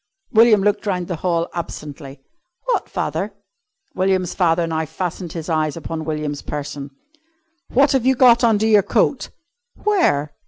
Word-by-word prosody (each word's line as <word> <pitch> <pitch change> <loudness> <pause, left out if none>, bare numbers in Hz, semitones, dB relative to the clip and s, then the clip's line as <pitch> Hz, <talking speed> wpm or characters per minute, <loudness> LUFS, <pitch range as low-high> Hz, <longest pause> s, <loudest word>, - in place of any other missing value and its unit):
William 220 -3 +5
looked 205 +1 0
round 180 -3 -1
the 175 - -3
hall 170 0 0
absently. 145 -4 -7 0.5
"What, - - -1
father?" - - -3 0.6
William's 185 -1 0
father 170 -2 +2
now 160 -1 -2
fastened 175 +1 -5
his 165 -2 -6
eyes 155 -2 0
upon 160 0 -5
William's 150 -2 -3
person. 145 -1 -6 0.8
"What 275 +3 +3
have 265 -3 +2
you 265 - +4
got 245 -1 +5
under 220 -2 +3
your 215 -2 +5
coat?" 240 +7 0 0.5
"Where?" 250 - +1
175 Hz, 145 wpm, -20 LUFS, 155-220 Hz, 0.8 s, William